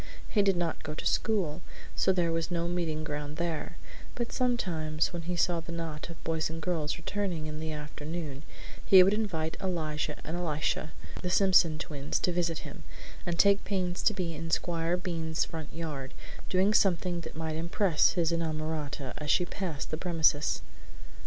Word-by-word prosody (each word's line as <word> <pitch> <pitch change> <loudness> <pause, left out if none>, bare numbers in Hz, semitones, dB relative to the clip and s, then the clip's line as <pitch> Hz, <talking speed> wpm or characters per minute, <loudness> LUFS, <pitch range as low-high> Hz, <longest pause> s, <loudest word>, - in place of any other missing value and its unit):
He 240 -9 +3
did 195 -2 +3
not 170 -2 -1
go 155 -1 -5
to - - -6
school, 180 -7 +1 0.3
so - - +4
there 175 -3 +2
was 165 0 0
no 170 -1 0
meeting 165 -3 -1
ground 150 -1 -4
there, 170 -2 -2 0.4
but 240 -1 -2
sometimes, 170 -12 0
when 170 - -3
he 175 +2 -3
saw 175 0 +2
the 165 - -8
knot 165 -2 -4
of 165 - -10
boys 160 -1 0
and 165 0 -5
girls 160 -3 -1
returning 185 -6 -2
in 155 0 -5
the 160 0 -3
afternoon, 150 -1 -5 0.4
he 190 -2 +9
would 195 +2 +4
invite 170 -7 -1
Elijah 155 -5 -1
and 160 - -4
Elisha, 155 -2 -1 0.3
the 180 - -2
Simpson 180 -4 +5
twins, 145 -2 -2
to 180 - +1
visit 170 -2 -1
him, - - -9 0.4
and 170 -1 0
take 200 +2 +5
pains 185 -3 -1
to 215 - +3
be 175 -4 -2
in 165 +1 -5
Squire 170 +1 +1
Bean's 165 -3 -1
front 160 -3 -6
yard, 150 -5 -5 0.3
doing 190 +3 +3
something 180 -3 +3
that - - -8
might 160 -1 -3
impress 170 +1 +3
his 170 -2 +2
inamorata 155 -4 -2
as 150 -1 -4
she 180 - +4
passed 175 -6 -4
the 155 - -1
premises. 160 -4 +2
165 Hz, 175 wpm, -30 LUFS, 155-180 Hz, 0.4 s, he